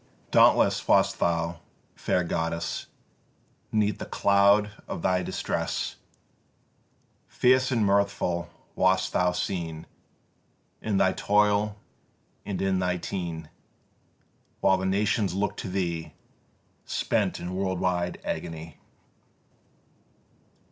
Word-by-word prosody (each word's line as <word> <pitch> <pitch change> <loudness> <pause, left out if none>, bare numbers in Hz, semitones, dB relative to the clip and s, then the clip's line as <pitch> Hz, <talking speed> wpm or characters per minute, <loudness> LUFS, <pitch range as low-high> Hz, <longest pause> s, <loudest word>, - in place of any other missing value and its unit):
Dauntless - - +4
wast - - +3
thou, 85 0 0 0.4
fair 90 - 0
goddess, 85 -1 -2 0.8
'Neath 105 -2 +1
the - - -6
cloud 100 +1 +4 0.2
of - - -5
thy 90 -1 +2
distress; - - -3 1.3
Fierce 130 +1 +3
and 115 -4 +2
mirthful 100 -4 +1 0.3
wast 95 0 +2
thou 90 0 +2
seen 85 -3 -3 1.0
In 105 -3 0
thy 95 - +3
toil 105 0 +2 0.7
and 100 - -3
in 95 -1 +1
thy 90 -1 0
teen; 85 -3 -5 1.1
While 95 - +4
the 95 0 -2
nations 100 -1 +1
looked 100 +1 -1
to - - -5
thee, 85 -5 -3 0.7
Spent - - -1
in 90 +1 -5
worldwide 90 -2 -1
agony. 80 -1 -5
95 Hz, 100 wpm, -27 LUFS, 85-100 Hz, 1.3 s, Dauntless